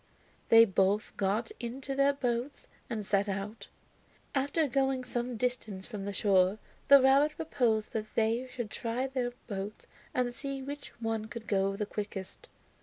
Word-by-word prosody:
They 230 Hz, 0 st, +9 dB
both 195 Hz, +1 st, +1 dB
got 205 Hz, +4 st, 0 dB
into 260 Hz, +3 st, -4 dB
their 275 Hz, +1 st, +4 dB
boats 250 Hz, 0 st, -2 dB, 0.2 s
and 220 Hz, -4 st, -3 dB
set 200 Hz, +1 st, +1 dB
out. 200 Hz, +3 st, -4 dB, 0.7 s
After 285 Hz, +3 st, +1 dB
going 270 Hz, 0 st, +1 dB
some 245 Hz, -1 st, -3 dB
distance 215 Hz, -5 st, -2 dB
from 205 Hz, -4 st, -6 dB
the 200 Hz, -, -2 dB
shore 195 Hz, -1 st, +3 dB, 0.3 s
the 280 Hz, 0 st, +10 dB
rabbit 275 Hz, +3 st, +4 dB
proposed 235 Hz, -9 st, 0 dB
that 215 Hz, -1 st, -4 dB
they 230 Hz, +3 st, +1 dB
should 240 Hz, -4 st, -5 dB
try 240 Hz, +2 st, -2 dB
their 255 Hz, -2 st, -2 dB
boats 200 Hz, -1 st, -5 dB, 0.3 s
and 245 Hz, -1 st, 0 dB
see 275 Hz, +1 st, -4 dB
which 285 Hz, +1 st, -6 dB
one 225 Hz, -1 st, -1 dB
could 225 Hz, +1 st, -8 dB
go 195 Hz, -1 st, +1 dB
the 210 Hz, -, -2 dB
quickest. 205 Hz, -2 st, -6 dB
230 Hz, 155 wpm, -31 LUFS, 210-265 Hz, 0.7 s, the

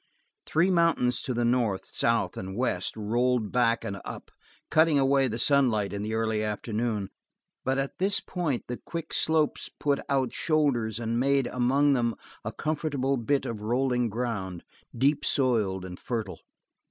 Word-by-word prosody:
Three 170 Hz, +5 st, +3 dB
mountains, 165 Hz, -8 st, +2 dB
to -, -, -3 dB
the 120 Hz, 0 st, +1 dB
north, 120 Hz, -5 st, 0 dB
south 115 Hz, -6 st, +1 dB
and 95 Hz, +2 st, -6 dB
west, 115 Hz, -6 st, -1 dB
rolled 120 Hz, +1 st, 0 dB
back 115 Hz, -2 st, +2 dB
and 100 Hz, -1 st, -5 dB
up, -, -, -8 dB, 0.4 s
cutting 160 Hz, -1 st, +4 dB
away 135 Hz, 0 st, +3 dB
the 115 Hz, -2 st, -3 dB
sunlight 120 Hz, -6 st, +2 dB
in 100 Hz, -, -3 dB
the 110 Hz, +1 st, -2 dB
early 110 Hz, -1 st, 0 dB
afternoon, 105 Hz, -1 st, -2 dB, 0.5 s
but 130 Hz, +1 st, 0 dB
at 135 Hz, 0 st, -3 dB
this 195 Hz, +2 st, +2 dB
point 165 Hz, -9 st, -2 dB
the 125 Hz, -, -4 dB
quick 165 Hz, -2 st, -6 dB
slopes 160 Hz, -2 st, +1 dB
put 140 Hz, -1 st, -1 dB
out 135 Hz, -3 st, +1 dB
shoulders 130 Hz, -9 st, +1 dB
and 115 Hz, 0 st, -1 dB
made, 135 Hz, 0 st, +2 dB
among 135 Hz, +4 st, +2 dB
them, 120 Hz, -3 st, +1 dB, 0.3 s
a -, -, -3 dB
comfortable 150 Hz, -3 st, -1 dB
bit 135 Hz, +3 st, 0 dB
of 110 Hz, -3 st, -4 dB
rolling 125 Hz, +1 st, +1 dB
ground, 100 Hz, -6 st, -3 dB, 0.3 s
deep 140 Hz, +4 st, +2 dB
soiled 105 Hz, -8 st, +1 dB
and 90 Hz, -1 st, -8 dB
fertile. 110 Hz, -8 st, -4 dB
125 Hz, 155 wpm, -27 LUFS, 110-140 Hz, 0.5 s, cutting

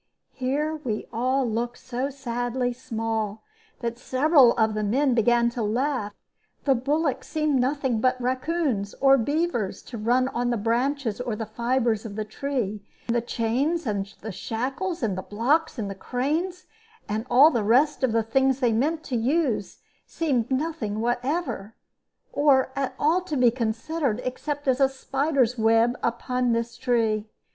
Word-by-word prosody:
Here 290 Hz, +5 st, -1 dB
we 215 Hz, -4 st, -2 dB
all 255 Hz, +3 st, +1 dB
looked 235 Hz, +2 st, -2 dB
so 255 Hz, +2 st, -3 dB
sadly 245 Hz, -2 st, -2 dB
small 225 Hz, -3 st, -3 dB, 0.4 s
that 235 Hz, 0 st, -3 dB
several 265 Hz, -1 st, +5 dB
of 220 Hz, -1 st, +2 dB
the 215 Hz, -, -2 dB
men 255 Hz, +6 st, +2 dB
began 235 Hz, +1 st, +3 dB
to 240 Hz, -, -4 dB
laugh; 225 Hz, -1 st, -1 dB, 0.5 s
the 275 Hz, -, +4 dB
bullocks 275 Hz, +1 st, -1 dB
seemed 305 Hz, -3 st, +1 dB
nothing 260 Hz, -3 st, 0 dB
but 255 Hz, +1 st, +2 dB
raccoons 255 Hz, -4 st, -1 dB
or 270 Hz, 0 st, +5 dB
beavers 285 Hz, -, -1 dB
to 235 Hz, -, -8 dB
run 245 Hz, +4 st, +2 dB
on 245 Hz, -1 st, -1 dB
the 240 Hz, -, +1 dB
branches 240 Hz, +2 st, 0 dB
or 245 Hz, -3 st, -2 dB
the 225 Hz, -, -4 dB
fibres 235 Hz, 0 st, 0 dB
of 215 Hz, -3 st, -7 dB
the 215 Hz, 0 st, -3 dB
tree; 215 Hz, -4 st, -3 dB, 0.2 s
and 235 Hz, -, 0 dB
the 235 Hz, -, +2 dB
chains 250 Hz, +9 st, -1 dB
and 200 Hz, -2 st, -3 dB
the 220 Hz, -, -5 dB
shackles, 265 Hz, -, -3 dB
and 205 Hz, -4 st, 0 dB
the 185 Hz, -, -3 dB
blocks 265 Hz, -, 0 dB
and 200 Hz, -3 st, -4 dB
cranes, 315 Hz, -, -2 dB, 0.4 s
and 220 Hz, +3 st, -3 dB
all 285 Hz, +6 st, +7 dB
the 230 Hz, -6 st, 0 dB
rest 265 Hz, +7 st, +3 dB
of 260 Hz, -, +3 dB
the 225 Hz, 0 st, +2 dB
things 265 Hz, +3 st, +2 dB
they 245 Hz, -4 st, +2 dB
meant 305 Hz, +8 st, 0 dB
to 265 Hz, -, -4 dB
use, 250 Hz, -2 st, 0 dB, 0.3 s
seemed 260 Hz, -8 st, -1 dB
nothing 260 Hz, -7 st, -2 dB
whatever, 240 Hz, -, -2 dB, 0.6 s
or 275 Hz, -3 st, +3 dB
at 275 Hz, -1 st, -2 dB
all 330 Hz, +5 st, +2 dB
to 320 Hz, -5 st, -4 dB
be 245 Hz, -2 st, +5 dB
considered, 235 Hz, +2 st, -1 dB
except 290 Hz, +3 st, -4 dB
as 260 Hz, 0 st, +3 dB
a 270 Hz, -1 st, +5 dB
spider's 270 Hz, -2 st, 0 dB
web 225 Hz, +2 st, +4 dB
upon 245 Hz, +1 st, 0 dB
this 230 Hz, 0 st, -2 dB
tree. 225 Hz, -4 st, 0 dB
245 Hz, 160 wpm, -25 LUFS, 225-275 Hz, 0.6 s, all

